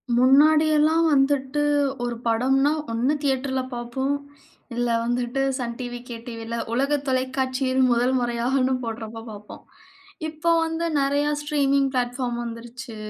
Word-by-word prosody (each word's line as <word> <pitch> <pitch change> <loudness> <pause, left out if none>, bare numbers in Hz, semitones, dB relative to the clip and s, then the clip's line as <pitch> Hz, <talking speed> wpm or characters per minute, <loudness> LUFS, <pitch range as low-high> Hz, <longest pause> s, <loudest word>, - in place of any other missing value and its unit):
முன்னாடி 290 +5 +5
எல்லாம் 315 +2 +3
வந்துட்டு 270 +1 +2 0.4
ஒரு 240 -1 -2
படம்ன்னா, 265 +5 +2 0.2
ஒண்ணு 240 +5 +1
தியேட்டர்ல 265 -1 0
பார்ப்போம். 245 +4 -2 0.6
இல்ல 240 0 0
வந்துட்டு 245 +2 -1 0.2
சன் 235 -3 -4
டிவி, 245 -1 -5
கே 240 - -5
டிவில 230 -1 -5 0.2
உலக 275 +4 +2
தொலைக்காட்சியில் 260 0 0
1 245 +2 +2
முறையாகன்னு 245 +2 0
போடுறப்ப 225 0 -6
பார்ப்போம். 210 0 -11 0.7
இப்ப 320 +2 0
வந்து 325 +1 -2 0.2
நெறைய 285 +1 +1 0.2
ஸ்ட்ரீமிங் 280 -2 +1
பிளாட்பார்ம் 245 -1 -1
வந்துருச்சு. 235 +1 -8
260 Hz, 120 wpm, -24 LUFS, 240-275 Hz, 0.7 s, முன்னாடி